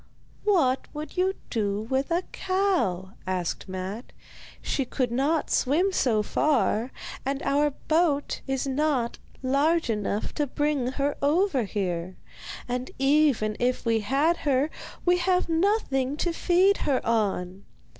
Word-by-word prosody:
'What 310 -11 +2
would 305 +1 -6
you 380 +1 +1 0.2
do 205 -3 0
with 265 +4 -1
a 345 +2 +1
cow?' 365 - 0 0.2
asked 185 0 -2
Matte. 190 +5 -5 0.5
'She 275 - -1
could 250 -1 -1
not 285 +6 0
swim 330 +9 +2
so 225 - +2
far, 250 -2 +1 0.3
and 275 +1 -1
our 290 +1 +2
boat 310 0 0
is 270 0 -1
not 270 -3 0 0.2
large 285 +2 +2
enough 210 -1 -2
to 295 -2 -1
bring 290 -1 0
her 285 +1 0
over 290 - +2
here; 185 -3 -3 0.5
and 250 +1 -3
even 270 -6 +3
if 250 +1 0
we 230 -1 +2
had 280 +10 +2
her, 280 +1 +1 0.3
we 355 0 +4
have 365 +1 +2
nothing 325 - +1
to 345 +2 0
feed 370 +4 +3
her 270 -3 0
on. 195 -4 -1
275 Hz, 135 wpm, -26 LUFS, 230-320 Hz, 0.5 s, we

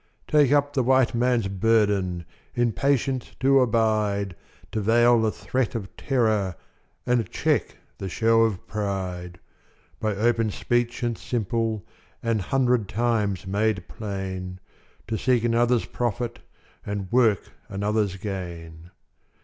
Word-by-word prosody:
Take 145 -3 +4
up 145 0 +3
the 135 - +2
White 130 0 +3
Man's 120 -3 +2
burden 100 -4 +1 0.3
In 120 -1 +2
patience 135 0 0
to 135 +1 +5
abide, 110 -5 +1 0.4
To 110 - -1
veil 120 +2 +4
the 110 - +2
threat 125 0 -2
of 100 -5 -5
terror 110 -8 +1 0.5
And 125 -2 +1
check - - 0 0.2
the 95 - -4
show 115 +4 +3
of 110 -5 0
pride; 95 -4 -4 0.6
By 110 -2 -1
open 115 +1 +2
speech 120 +3 -1
and 120 -1 0
simple, 115 -2 -2 0.4
An 115 -2 +1
hundred 125 0 +1
times 105 -5 0
made 100 -1 0
plain, 95 -4 -5 0.5
To 110 -1 -2
seek 125 -3 +2
another's 120 0 +2
profit, 120 0 -3 0.4
And 100 -2 -4
work 115 -5 +3 0.2
another's 100 0 0
gain. 85 -4 -7
110 Hz, 125 wpm, -25 LUFS, 100-120 Hz, 0.6 s, to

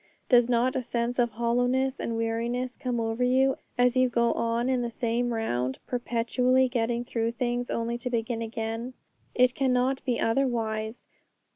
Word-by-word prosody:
Does 245 -1 +5
not 245 +1 +2
a 260 - 0
sense 240 0 -2
of 240 -1 +3
hollowness 245 +4 0
and 230 - -2
weariness 235 +3 -2
come 250 -3 -2
over 225 +2 -1
you 260 +2 +3 0.2
as 245 0 +3
you 255 0 +4
go 235 -1 +2
on 230 +1 0
in 260 -1 +1
the 240 - -2
same 240 0 -1
round, 130 - -1
perpetually 250 +2 +1
getting 240 -1 -1
through 230 -1 -1
things 245 0 -2
only 235 +1 -2
to 250 - -3
begin 230 -1 -2
again? 225 +2 -4 0.4
It 250 0 +4
cannot 260 0 +1
be 245 -3 -1
otherwise. 225 -2 -1
240 Hz, 160 wpm, -27 LUFS, 230-250 Hz, 0.4 s, Does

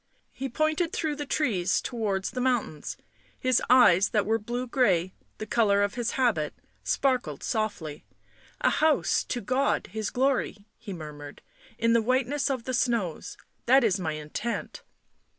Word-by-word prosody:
He 270 +2 -5
pointed 310 +5 0
through 310 -3 -1
the 290 -1 -5
trees 200 - +1
towards 205 -6 -2
the 250 - -3
mountains; 245 - -1 0.4
his 255 -1 +2
eyes, 205 -7 +6
that 210 -2 +1
were 225 +2 +1
blue 240 +4 -3
grey, 190 -9 +1 0.2
the 215 - -5
colour 205 -3 +3
of 205 - -1
his 240 -1 -2
habit, 225 - +1 0.3
sparkled 260 -2 0
softly. 205 - -3 0.3
" - - -28
A - - +3
house 310 -1 +2
to 245 - -3
God 255 +6 0
His 220 +1 -3
glory," 255 -5 0
he 210 - -8
murmured. 150 -4 -9 0.2
" - - -23
In 230 0 +2
the 230 - +4
whiteness 260 +4 0
of 260 -4 -2
the 255 - -4
snows. 235 -9 -1 0.3
That 265 +2 +6
is 205 -4 +2
my 160 -4 -2
intent." 155 +10 -4
235 Hz, 160 wpm, -27 LUFS, 195-255 Hz, 0.4 s, eyes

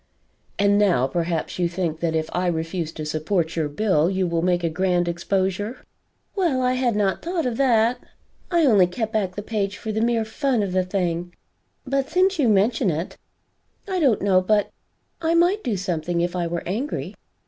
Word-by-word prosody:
"And 200 0 +3
now 180 -11 +3
perhaps 165 +4 -2
you 175 -1 +1
think 170 -3 -2
that 165 -1 -1
if 160 0 0
I 180 +1 0
refuse 165 0 -2
to 155 - -6
support 160 +2 -1
your 155 -3 -1
bill, 165 0 +2
you 190 -1 0
will 170 -1 0
make 175 0 +1
a - - +2
grand 175 0 +1
exposure?" 190 +6 -2 0.5
"Well 330 -10 +1
I 250 0 +2
had 250 -3 +1
not 195 -3 0
thought 340 -2 -2
of 240 -2 -2
that. 240 -3 +3 0.5
I 340 -3 +3
only 205 -9 +5
kept 220 +5 -4
back 195 -4 -1
the 205 - -5
page 205 -2 -2
for 220 - -5
the 220 +1 -1
mere 230 -1 +1
fun 245 0 0
of 195 - -3
the 185 0 +1
thing; 175 -2 -2 0.5
but 275 0 -1
since 375 0 +2
you 255 -6 +3
mention 215 +2 +2
it, 165 +2 -3 0.7
I 380 -2 -1
don't 260 - +2
know 190 -2 +4
but 205 +2 +1 0.5
I 330 0 +1
might 355 +5 +3
do 225 -5 -1
something 175 -2 -2
if 175 +1 -1
I 175 -1 -1
were 170 0 -3
angry." 230 - -3
195 Hz, 190 wpm, -23 LUFS, 175-235 Hz, 0.7 s, only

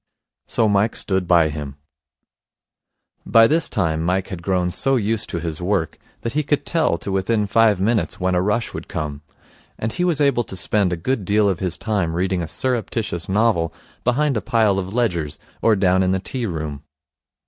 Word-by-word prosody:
So 115 - +2
Mike 105 +2 +2
stood 95 -2 -1
by 85 -3 +4
him. 75 -2 -6 1.5
By 115 0 +6
this 160 +7 +2
time 80 -1 0
Mike 90 +3 0
had 90 -3 -6
grown 90 -1 0
so 135 +8 +1
used 110 -2 -1
to 85 - -3
his 80 0 -4
work 90 -3 -1 0.2
that 115 - -3
he 150 - +1
could 145 0 -1
tell 160 - +1
to 95 - -5
within 105 +3 +1
five 110 -1 +3
minutes 100 -4 0
when 90 0 0
a 90 - +2
rush 105 +5 -1
would - - -7
come; 75 -2 -4 0.6
and 110 +1 -3
he 180 - -1
was 175 -5 +2
able 140 -4 +3
to 95 - -7
spend 95 0 +1
a 90 - -1
good 115 +6 -1
deal 105 +2 +2
of 95 -3 0
his 90 -3 -1
time 100 -7 -1
reading 90 0 0
a 85 - -3
surreptitious 110 -3 -2
novel 95 -6 +1 0.3
behind 135 +3 +1
a - - -1
pile 105 -1 +2
of 95 0 -5
ledgers, 85 -11 -1 0.2
or 115 -1 +4
down 95 -1 +3
in 95 - +2
the 95 0 +1
tea 120 +5 -3
room. 75 -5 -4
95 Hz, 190 wpm, -21 LUFS, 85-115 Hz, 1.5 s, By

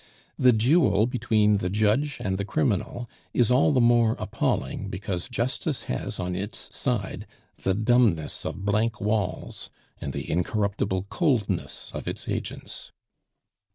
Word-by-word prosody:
The 125 - +7
duel 115 - +4
between 110 -4 +2
the 90 -2 -1
judge 110 +8 +2
and 95 -5 -2
the - - 0
criminal 120 -1 -1 0.3
is 120 -1 +4
all 130 +4 +5
the 135 - +3
more 120 -2 +4
appalling - - -1
because 95 -1 -3
justice 130 +4 -1
has 65 - -3
on 90 0 -2
its 100 +4 -5
side 115 -8 -2 0.3
the 95 - +1
dumbness 110 -7 +2
of 95 - -5
blank 110 +3 +1
walls 105 -2 -2 0.3
and - - -4
the - - -5
incorruptible 95 +1 0
coldness 100 - 0
of - - -6
its - - -4
agents. - - -4
110 Hz, 135 wpm, -26 LUFS, 95-120 Hz, 0.3 s, The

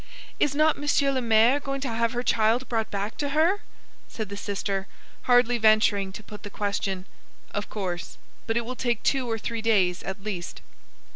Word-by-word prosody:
"Is 285 -1 +2
not 310 0 +3
Monsieur 285 -1 +2
le 260 -1 0
Maire 230 +4 +4
going 275 -1 -4
to 275 - -2
have 230 +1 0
her 245 0 -2
child 230 +2 +2
brought 225 -2 -1
back 200 +2 -3
to 285 0 -1
her?" 360 +6 +3 0.5
said 215 -3 -5
the 200 - -5
sister, 200 -1 -3 0.4
hardly 245 -1 +5
venturing 215 -3 +4
to 210 - -8
put 210 0 -10
the 205 - -7
question. 200 -2 -2 0.5
"Of 205 0 -4
course; 180 -4 -4 0.3
but 225 +1 +1
it 235 - -1
will 255 +2 -5
take 240 -3 -1
two 260 -3 +1
or 225 - 0
three 230 +1 -4
days 190 -6 +2
at 195 0 -6
least." 185 -5 -5
225 Hz, 190 wpm, -26 LUFS, 200-255 Hz, 0.5 s, hardly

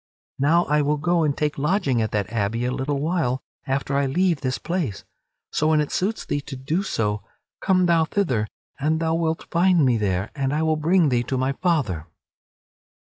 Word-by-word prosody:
Now 165 +5 +3
I 150 +1 +2
will 150 +1 +1
go 170 +3 +1
and 145 -2 0
take 150 -2 -1
lodging 145 - +1
at 110 - 0
that 105 +1 -2
abbey 115 +2 0
a 125 - 0
little 135 +2 -2
while 150 -5 0 0.2
after 135 +1 -1
I 140 0 +2
leave 170 +2 +1
this 130 -2 -1
place. 170 - -3 0.5
So 155 - +1
when 155 -1 +4
it 150 - -1
suits 210 +5 -1
thee 145 - -1
to 140 0 -8
do 145 +8 -1
so, 105 - -1 0.4
come 185 -2 +3
thou 165 -2 +3
thither 145 - 0 0.3
and 155 +3 +1
thou 160 0 0
wilt 165 -1 -1
find 175 -3 +4
me 125 -3 +3
there 95 -2 -1
and 135 -1 -1
I 155 - +1
will 160 0 +2
bring 165 +1 +3
thee 120 -2 +2
to 130 - -2
my 130 +1 +1
father." 135 - -1
145 Hz, 195 wpm, -23 LUFS, 130-165 Hz, 0.5 s, when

